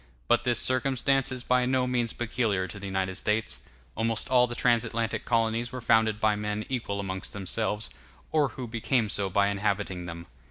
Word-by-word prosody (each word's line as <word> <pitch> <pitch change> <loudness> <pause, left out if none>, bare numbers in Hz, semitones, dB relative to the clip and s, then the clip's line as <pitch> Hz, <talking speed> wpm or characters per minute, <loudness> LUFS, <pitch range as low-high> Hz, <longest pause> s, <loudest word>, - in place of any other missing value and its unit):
But 120 +1 +3
this 120 -2 +2
circumstance 130 +2 +2
is 125 -1 -4
by 125 0 +2
no 130 0 +2
means 120 -2 0
peculiar 110 -5 -1
to 100 - -8
the 100 - -6
United 95 -1 -1
States; 110 +1 -1 0.3
almost 115 0 0
all 125 -1 +5
the 120 - -5
trans 120 -2 +3
Atlantic 115 -1 -2
colonies 115 +1 +1
were 125 - -5
founded 110 -2 +3
by 110 -1 +3
men 105 0 -3
equal 115 -6 -2
amongst 95 -1 -4
themselves, 105 +2 -1 0.4
or 150 -2 +3
who 130 - -4
became 115 0 0
so 100 -1 0
by 100 +2 +3
inhabiting 100 -3 -1
them. 85 0 -7
115 Hz, 185 wpm, -28 LUFS, 100-125 Hz, 0.4 s, all